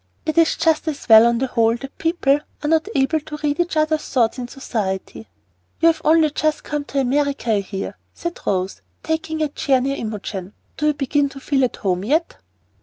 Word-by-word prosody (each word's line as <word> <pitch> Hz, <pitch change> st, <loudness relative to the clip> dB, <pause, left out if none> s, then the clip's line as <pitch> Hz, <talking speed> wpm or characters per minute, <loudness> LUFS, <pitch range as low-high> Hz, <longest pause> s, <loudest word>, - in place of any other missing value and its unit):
It 315 Hz, -, -1 dB
is 330 Hz, -1 st, +4 dB
just 320 Hz, 0 st, +1 dB
as 295 Hz, -2 st, -4 dB
well, 225 Hz, 0 st, +9 dB
on 235 Hz, 0 st, +2 dB
the 265 Hz, -, 0 dB
whole, 230 Hz, -2 st, +2 dB
that 270 Hz, +2 st, -10 dB
people 325 Hz, -4 st, +2 dB, 0.2 s
are -, -, 0 dB
not 320 Hz, +3 st, +2 dB
able 275 Hz, +4 st, +2 dB
to 300 Hz, 0 st, -8 dB
read 295 Hz, +1 st, 0 dB
each 345 Hz, -2 st, 0 dB
other's 310 Hz, 0 st, +1 dB
thoughts 240 Hz, -1 st, +1 dB
in 245 Hz, -, -4 dB
society. 220 Hz, -5 st, -4 dB, 0.5 s
"You've 330 Hz, -1 st, +3 dB
only 315 Hz, -1 st, +4 dB
just 310 Hz, 0 st, -1 dB
come 295 Hz, -1 st, -3 dB
to 280 Hz, -, -2 dB
America, 275 Hz, -2 st, 0 dB
I 210 Hz, -, +3 dB
hear," 195 Hz, 0 st, -5 dB, 0.2 s
said 340 Hz, 0 st, -6 dB
Rose, 190 Hz, -1 st, -1 dB, 0.2 s
taking 320 Hz, 0 st, -2 dB
a -, -, +1 dB
chair 275 Hz, -2 st, +1 dB
near 275 Hz, +2 st, -1 dB
Imogen. 205 Hz, -3 st, -5 dB, 0.2 s
"Do 300 Hz, -, 0 dB
you 300 Hz, -, +3 dB
begin 285 Hz, 0 st, +1 dB
to 275 Hz, -, -10 dB
feel 270 Hz, 0 st, +1 dB
at 245 Hz, -, -4 dB
home 185 Hz, -2 st, -1 dB
yet?" 310 Hz, -, 0 dB
280 Hz, 200 wpm, -21 LUFS, 230-310 Hz, 0.5 s, well